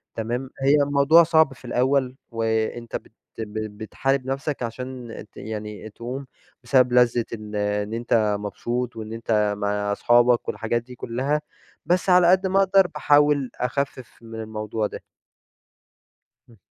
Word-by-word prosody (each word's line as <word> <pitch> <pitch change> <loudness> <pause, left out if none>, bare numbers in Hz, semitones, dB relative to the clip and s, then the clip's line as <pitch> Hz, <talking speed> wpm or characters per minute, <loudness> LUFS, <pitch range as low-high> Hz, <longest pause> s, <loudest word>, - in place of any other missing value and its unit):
تمام، 120 +4 -3
هي 140 +2 +5
الموضوع 145 +4 +5
صعب 160 -2 +3
في - - -16
الأول، 130 +1 +1 0.2
وأنت 115 +1 -2
بت - - -6 0.3
ب 110 - -1 0.2
ب 105 -1 -15
بتحارب 135 +5 -1
نفسك 135 +1 -3
عشان 125 0 -6 0.2
ت - - -19
يعني 105 0 -6
تقوم 125 +6 -6 0.4
بسبب 125 0 +3
لذة 120 -1 +4
إن 105 -1 -7
إن 105 +1 -1
أنت 110 -3 +1
مبسوط، 120 +4 -3
وإن 110 0 -7
أنت 105 -2 0
مع 105 0 -1
اصحابك، 120 +3 +3
والحاجات 120 +1 -1
دي 125 0 -12
كلها، 135 +6 -1 0.4
بس 180 +3 +1
على 180 -1 +6
قد 190 +1 +3
ما 195 +1 +2
أقدر 195 -1 +4
باحاول 145 -3 +3
أخفف 130 0 -3
من 115 -1 -8
الموضوع 110 0 -3
ده. - - -9 1.5
إمم. 115 - -19
120 Hz, 145 wpm, -24 LUFS, 110-140 Hz, 1.5 s, على